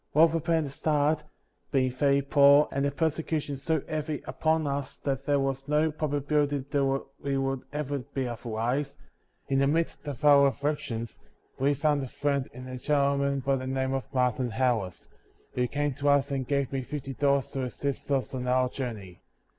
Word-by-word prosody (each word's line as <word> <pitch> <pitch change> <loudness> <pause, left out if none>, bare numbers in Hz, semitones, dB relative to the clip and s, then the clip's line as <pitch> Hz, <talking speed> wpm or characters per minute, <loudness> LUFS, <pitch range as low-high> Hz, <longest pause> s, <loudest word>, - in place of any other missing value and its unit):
While 160 +3 +6
preparing 165 0 +1
to 140 - -5
start, 150 +1 +1 0.2
— - - -44
^being 130 -3 +2
very 140 +1 +2
poor, 140 +1 +6
and 140 - -1
the 140 - +2
persecution 155 0 -1
so 145 +2 -1
heavy 155 -1 -3
upon 160 0 0
us 140 -1 -3
that 135 -1 -3
there 145 -1 +3
was 135 0 -2
no 150 +2 +2
probability 145 -1 0
that 135 -1 +1 0.2
we 140 -1 -1
would 135 -1 -1
ever 145 -1 -2
be 130 +1 -4
otherwise, 120 +4 -2 0.3
— - - -21
^in 135 - +3
the 140 - +3
midst 160 0 -1
of 145 0 -4
our 140 -1 +7
aflBictions 140 -6 -3 0.4
we 140 +2 +2
found 145 0 +1
a 135 - -4
friend 140 +1 -1
in 125 +1 -9
a 130 0 -6
gentleman 140 0 +1
by 135 +1 +1
the 130 0 -5
name 130 0 -1
of 135 -1 -3
Martin 125 -2 +1
Harris, 110 -6 -1 0.5
who 125 0 0
came 145 +1 -1
to 145 +3 0
us 140 0 +3
and 135 -2 -2
gave 140 -2 0
me 135 - 0
fifty 135 +1 -5
dollars 140 0 +1
to 135 - -3
assist 140 +3 -4
us 135 -4 0
on 125 -1 -3
our 125 0 +2
journey. 110 -10 -6
140 Hz, 185 wpm, -28 LUFS, 130-145 Hz, 0.5 s, our